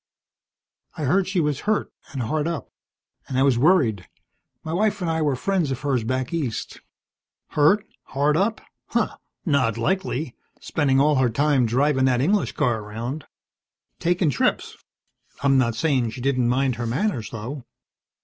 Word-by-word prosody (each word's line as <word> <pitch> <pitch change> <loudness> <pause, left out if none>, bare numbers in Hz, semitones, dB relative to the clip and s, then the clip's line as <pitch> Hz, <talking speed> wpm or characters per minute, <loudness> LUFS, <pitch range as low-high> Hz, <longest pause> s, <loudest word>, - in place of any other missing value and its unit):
"I 155 - -3
heard 180 +7 +2
she 190 -1 0
was 150 -4 0
hurt, 215 - 0 0.2
and 135 -3 -3
hard 150 +7 -1
up, 170 -3 -4 0.6
and 130 - -3
I 135 - +4
was 135 -4 +3
worried. 125 - +3 0.6
My 160 - -4
wife 205 +2 +1
and 175 -3 -1
I 160 0 0
were 145 -3 +1
friends 175 +3 0
of 130 -2 -3
hers 135 -5 0
back 130 +4 -2
east." 140 -9 -3 0.7
"Hurt, 190 +8 +3 0.2
hard 145 +2 +1
up? 205 +6 +1 0.3
Humph! - - 0 0.3
Not 130 - +2
likely, 160 -2 -1 0.2
spendin' 135 -3 +1
all 150 +1 +4
her 130 -2 +3
time 135 +1 +2
drivin' 130 +3 +2
that 125 -2 +2
English 195 +10 +1
car 120 -3 +1
around. 115 +8 -6 0.7
Takin' 175 -2 +1
trips. - - 0 0.7
I'm 135 -1 +4
not 115 -3 +1
sayin' 135 -7 +1
she 115 - -8
didn't 125 -2 +1
mind 130 -1 +1
her 120 0 -3
manners, 120 - -1
though." 120 +5 -6
140 Hz, 160 wpm, -23 LUFS, 125-160 Hz, 0.7 s, I